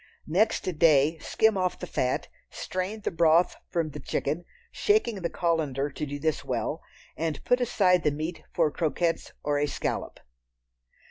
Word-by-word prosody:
Next 205 +8 +2 0.2
day 155 0 +5
skim 220 +4 +2
off 185 -1 0
the - - -6
fat, 130 -7 -1 0.2
strain 185 +4 -4
the - - -2
broth 165 0 +4
from 165 -3 -1
the 150 - -7
chicken, 150 +4 -2 0.3
shaking 240 - +1
the 170 - -1
colander 150 -5 0
to 150 - -4
do 145 +1 -4
this 155 0 -1
well, - - -2 0.3
and 160 -2 -3
put 245 0 +3
aside 185 -7 +3
the 150 - +2
meat 155 +4 -4
for 150 - +2
croquettes 165 +1 -1
or 145 0 +1
a 145 - +1
scallop. - - -3
165 Hz, 155 wpm, -27 LUFS, 150-185 Hz, 0.3 s, day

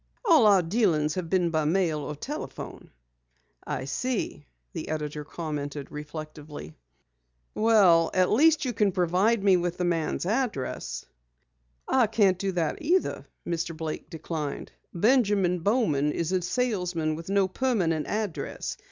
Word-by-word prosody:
"All 315 - +6
our 195 -3 +5
dealings 165 -6 +1
have 180 -2 -4
been 180 -2 +2
by 155 -1 +1
mail 165 -1 +1
or 150 +1 -5
telephone." 295 - -7 0.8
"I 130 - -3
see," 215 - -3 0.3
the - - -5
editor 150 -1 -3
commented 145 -3 -5
reflectively. 150 - -8 0.8
"Well, 195 -7 +5
at 185 -1 +3
least 310 +6 +4
you 250 - -1
can 210 -3 +2
provide 190 +5 +2
me 195 -2 +5
with 175 0 -2
the 180 - -1
man's 170 -1 -1
address." 185 - -2 0.8
"I 255 -4 +3
can't 200 -4 +3
do 195 0 -1
that 170 -3 -1
either," 350 +5 0 0.2
Mr. 165 -1 -2
Blake 160 -1 -5
declined. 155 -2 -5 0.2
"Benjamin 200 -3 +2
Bowman 165 - +1
is 170 +2 -2
a 185 -1 +1
salesman 180 -6 -1
with 165 +3 -7
no 195 -1 +3
permanent 185 - 0
address. 210 -5 -3
175 Hz, 135 wpm, -27 LUFS, 155-210 Hz, 0.8 s, All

